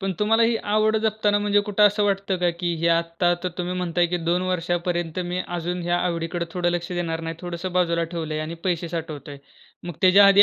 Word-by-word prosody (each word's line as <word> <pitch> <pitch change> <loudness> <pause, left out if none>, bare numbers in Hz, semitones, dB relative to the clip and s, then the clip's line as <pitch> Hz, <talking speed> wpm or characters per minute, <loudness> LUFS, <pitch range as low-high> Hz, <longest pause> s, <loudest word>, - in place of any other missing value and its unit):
पण 195 -1 -1
तुम्हाला 225 +2 +3
ही 230 0 +3 0.2
आवड 215 0 +3
जपताना 215 -1 +2
म्हणजे 205 0 +2
कुठं 210 0 +5
असं 205 +1 +1
वाटतं 195 -1 0
का, 175 -1 +2
की 170 0 -2
हे 170 - +2
आत्ता 170 +1 +2
तर - - +1
तुम्ही 180 +1 -2
म्हणताय, 175 -1 +1
की 180 +1 -1
2 180 +1 +2
वर्षापर्यंत 175 -1 -1
मी 180 - -2
अजून 175 +1 -3
या 175 0 +2
आवडीकडं 170 0 -2
थोडं 175 -2 0
लक्ष 175 0 -2
देणार 165 -2 -2
नाही. 165 0 -5
थोडंसं 175 +1 -5
बाजूला 170 -2 +1
ठेवलंय 155 -2 -3
आणि 160 +2 -4
पैसे 175 -2 -1
साठवतोय. 155 -4 -6 0.5
मग 175 -3 -5
त्याच्या 195 +2 +7
आधी 200 +1 +8
175 Hz, 205 wpm, -23 LUFS, 170-195 Hz, 0.5 s, आधी